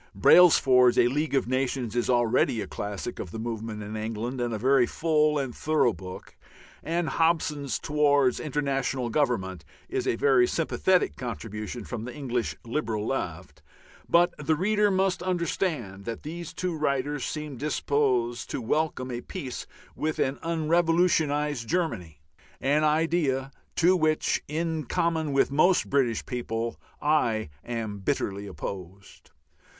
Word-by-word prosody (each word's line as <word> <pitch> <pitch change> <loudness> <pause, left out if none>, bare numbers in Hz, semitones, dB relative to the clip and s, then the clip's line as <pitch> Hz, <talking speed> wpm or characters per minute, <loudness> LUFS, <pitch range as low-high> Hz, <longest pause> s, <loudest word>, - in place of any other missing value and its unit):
Brailsford's 125 - +6
"A 120 - +5
League 145 +2 -1
of 135 - +1
Nations" 130 -2 -1
is 120 - 0
already 120 -1 +2
a 105 - -2
classic 105 +3 -5
of 90 - -5
the 110 - -7
movement 110 -1 -4
in 105 +1 -6
England, 115 +3 -3
and 120 -1 -1
a 110 - -2
very 130 +2 +3
full 155 -2 +2
and 135 -4 -2
thorough 155 -6 +2
book; 90 +1 -10 0.5
and 170 0 -1
Hobson's 150 -3 +1
"Towards 145 -3 +2
International 135 -4 -1
Government" 95 - 0 0.3
is - - -2
a - - +2
very 125 -1 +4
sympathetic 180 +3 +1
contribution 115 -1 -5
from 115 +1 -6
the 125 - -7
English 125 -5 -2
liberal 115 -4 -2
left; 90 -9 -4 0.5
but 175 +1 +4
the 155 +2 +1
reader 210 +5 +2
must 190 -1 +1
understand 170 - -2
that 115 -1 -5
these 170 +2 -6
two 180 -2 -3
writers 145 -1 -1
seem 150 -2 -4
disposed 130 -4 0
to - - -3
welcome 130 +1 -1
a 120 0 -4
peace 135 -7 -6 0.3
with 155 0 -2
an 135 +1 0
unrevolutionized 160 -5 +1
Germany, 110 - -2 0.4
an 145 +3 +2
idea 150 -4 +1 0.2
to 175 +2 +4
which, 155 -3 +1
in 160 0 -2
common 160 +2 0
with 135 0 +2
most 175 +6 +3
British 130 -5 +1
people, 115 -2 -3 0.2
I 120 - +1
am 110 -4 -4
bitterly 100 -3 -2
opposed. 95 0 -8
135 Hz, 140 wpm, -27 LUFS, 115-155 Hz, 0.5 s, Brailsford's